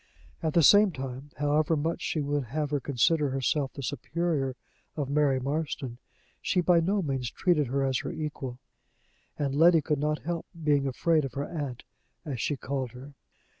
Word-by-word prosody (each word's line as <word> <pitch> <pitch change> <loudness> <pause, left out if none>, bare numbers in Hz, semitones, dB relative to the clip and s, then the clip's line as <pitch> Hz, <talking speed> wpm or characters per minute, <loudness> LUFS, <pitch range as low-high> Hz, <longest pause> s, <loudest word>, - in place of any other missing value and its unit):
At 160 -2 -1
the 170 - +6
same 205 +5 +7
time, 135 -1 -6
however 150 +3 +2
much 160 +3 -1
she 155 - -1
would 145 -1 -1
have 145 +4 -2
her 145 - +1
consider 140 +3 +2
herself 135 +1 0
the 140 - -7
superior 145 -1 -1 0.4
of 140 -2 -2
Mary 140 -3 +3
Marston, 135 -3 -3 0.4
she 185 - +1
by 175 -1 +4
no 195 +4 +1
means 135 -5 -2
treated 160 -3 +1
her 135 +3 0
as 130 -2 +1
her - - -4
own - - -6
equal, 145 -5 -4 0.8
and 140 -2 -1
Letty 165 +3 +6
could 150 0 0
not 150 +1 -1
help 170 0 -3 0.2
being 145 -2 +3
afraid 155 +4 +2
of 135 - -4
her 140 +1 -2
aunt, 145 -7 -5 0.4
as 135 -7 -3
she 145 - -1
called 130 -2 -3
her. 135 +3 -11
145 Hz, 180 wpm, -28 LUFS, 135-160 Hz, 0.8 s, same